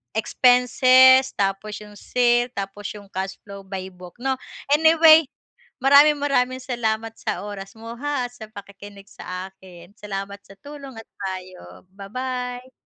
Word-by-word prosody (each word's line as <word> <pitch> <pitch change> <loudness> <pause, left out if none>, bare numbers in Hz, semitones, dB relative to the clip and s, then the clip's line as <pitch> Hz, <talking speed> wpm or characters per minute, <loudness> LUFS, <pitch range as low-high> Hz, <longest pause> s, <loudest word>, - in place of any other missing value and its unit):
expenses, 255 +3 +5
tapos 200 +1 -2
'yong 210 -1 -14
sale, 240 0 +1
tapos 200 0 -6
'yong 200 -1 -13
cash 190 +1 -4
flow 200 -1 -10
by 190 -1 -6
book 180 -1 -14
'no. 265 0 -1 0.3
Anyway, 320 +1 +6 0.6
maraming-maraming 280 -2 +4
salamat 225 -3 -2
sa - - -4
oras 195 -1 -9
mo 230 +1 -9
ha, 285 -2 -2
at 245 - -21
sa 220 -3 -10
pakikinig 200 -1 -12
sa 185 +1 -7
akin. 180 -2 -16
Salamat 200 -2 -7
sa 195 - -17
tulong 280 0 -11
at 225 - -10 0.2
payo. 185 - -8
Ba-bye. 250 +5 -6
220 Hz, 135 wpm, -22 LUFS, 195-255 Hz, 0.6 s, Anyway